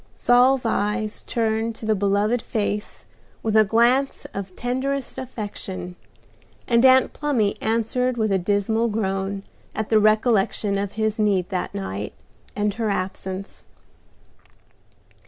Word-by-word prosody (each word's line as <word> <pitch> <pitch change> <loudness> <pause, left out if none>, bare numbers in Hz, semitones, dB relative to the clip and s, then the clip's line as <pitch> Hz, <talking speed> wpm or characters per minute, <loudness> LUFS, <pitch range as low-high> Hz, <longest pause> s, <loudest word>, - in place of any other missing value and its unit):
Saul's 250 +1 +4
eyes 215 0 -1
turned 225 -1 -1
to 220 - -8
the 220 - +3
beloved 205 +3 +1
face 210 -1 -3 0.4
with 220 -1 0
a 220 - +7
glance 240 +6 +2
of 195 -2 -6
tenderest 260 +2 -2
affection, 205 -7 -6 0.7
and 235 -1 +3
Aunt 260 0 +6
Plumy 250 -9 0
answered 235 +3 0
with 215 -2 +1
a 190 - +2
dismal 205 +5 +1
groan 195 -2 -2 0.3
at 220 -1 -3
the 220 - +5
recollection 215 -2 +2
of 200 -1 -3
his 220 0 -1
need 195 -4 +2
that 185 -1 -3
night, 95 +1 -4 0.4
and 205 0 0
her 225 0 -2
absence. 190 0 -4
215 Hz, 125 wpm, -23 LUFS, 200-235 Hz, 0.7 s, a